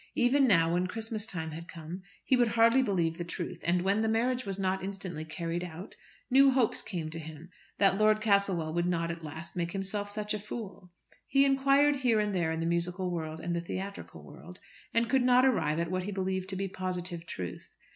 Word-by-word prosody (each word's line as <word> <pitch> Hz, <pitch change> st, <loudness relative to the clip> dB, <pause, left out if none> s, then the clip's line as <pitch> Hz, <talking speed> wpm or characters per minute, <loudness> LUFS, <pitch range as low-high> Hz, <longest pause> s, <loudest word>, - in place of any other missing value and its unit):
Even 265 Hz, +3 st, +4 dB
now, 165 Hz, -6 st, +4 dB
when 180 Hz, +1 st, +1 dB
Christmas 220 Hz, +1 st, -3 dB
time 160 Hz, -5 st, -3 dB
had 165 Hz, +2 st, -8 dB
come, 165 Hz, +3 st, -8 dB, 0.2 s
he 260 Hz, -, +3 dB
would 245 Hz, -1 st, +3 dB
hardly 230 Hz, +3 st, +4 dB
believe 175 Hz, -8 st, 0 dB
the -, -, -1 dB
truth, 170 Hz, +1 st, -5 dB
and 175 Hz, +1 st, +2 dB
when 200 Hz, +3 st, +2 dB
the 220 Hz, -, +1 dB
marriage 245 Hz, +1 st, 0 dB
was 195 Hz, -1 st, -3 dB
not 190 Hz, -1 st, -1 dB
instantly 190 Hz, -5 st, -5 dB
carried 170 Hz, +2 st, -4 dB
out, 180 Hz, +2 st, -8 dB, 0.4 s
new 275 Hz, +2 st, +7 dB
hopes 260 Hz, -4 st, +2 dB
came 165 Hz, -5 st, -5 dB
to 165 Hz, -, -5 dB
him 160 Hz, +2 st, -10 dB, 0.3 s
that 195 Hz, 0 st, +3 dB
Lord 215 Hz, 0 st, +4 dB
Castlewell 200 Hz, -7 st, +1 dB
would 175 Hz, +1 st, 0 dB
not 170 Hz, -1 st, 0 dB
at 165 Hz, -1 st, -8 dB
last 160 Hz, +2 st, -7 dB
make 170 Hz, -1 st, -2 dB
himself 205 Hz, +1 st, -2 dB
such 210 Hz, +1 st, -2 dB
a 210 Hz, -, -2 dB
fool. 200 Hz, -4 st, -8 dB, 0.4 s
He 275 Hz, 0 st, +4 dB
inquired 275 Hz, +1 st, +4 dB
here 245 Hz, -5 st, +2 dB
and 210 Hz, -1 st, 0 dB
there 170 Hz, -3 st, 0 dB
in 160 Hz, 0 st, -2 dB
the -, -, -1 dB
musical 180 Hz, +2 st, -1 dB
world 160 Hz, -2 st, -4 dB
and 170 Hz, +1 st, -2 dB
the 170 Hz, -, -1 dB
theatrical 195 Hz, +3 st, -6 dB
world, -, -, -12 dB, 0.3 s
and 230 Hz, 0 st, +2 dB
could 265 Hz, +2 st, +3 dB
not 250 Hz, +1 st, +5 dB
arrive 190 Hz, -12 st, +2 dB
at 170 Hz, +1 st, -1 dB
what 185 Hz, 0 st, 0 dB
he 195 Hz, +3 st, -4 dB
believed 190 Hz, -1 st, -2 dB
to 190 Hz, -, -3 dB
be 195 Hz, +1 st, -2 dB
positive 180 Hz, -2 st, -4 dB
truth. 90 Hz, -2 st, -6 dB
190 Hz, 215 wpm, -30 LUFS, 170-220 Hz, 0.4 s, new